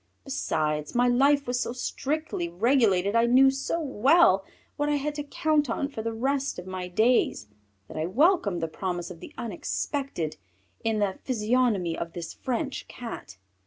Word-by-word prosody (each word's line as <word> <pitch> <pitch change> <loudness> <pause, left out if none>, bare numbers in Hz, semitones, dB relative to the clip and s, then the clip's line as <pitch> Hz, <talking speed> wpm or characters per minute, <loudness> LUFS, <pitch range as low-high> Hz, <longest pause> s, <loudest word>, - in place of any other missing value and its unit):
Besides 150 - -2
my 245 +1 +4
life 280 +3 +4
was 245 0 -1
so 235 - -2
strictly 270 - -3
regulated, 200 -1 +2
I 230 +1 +4
knew 265 +2 +6
so 270 +5 -2
well 270 - +4 0.3
what 290 0 0
I 295 - +2
had 290 +1 -2
to 295 0 -4
count 300 -1 +1
on 275 +5 -1
for 225 - -5
the 230 +1 -2
rest 270 +4 -1
of 180 - -7
my 185 -1 -5
days, 220 - +2 0.4
that - - -9
I 155 +1 -1
welcomed 225 - +2
the - - +1
promise 175 +1 -4
of 170 - -10
the - - -10
unexpected 230 - -3 0.5
in 225 -1 +1
the 200 -2 -1
physiognomy 220 -7 +1
of 170 -1 -5
this 170 -2 -6
French 265 +2 -3
Cat. 230 - -8
235 Hz, 165 wpm, -27 LUFS, 185-275 Hz, 0.5 s, knew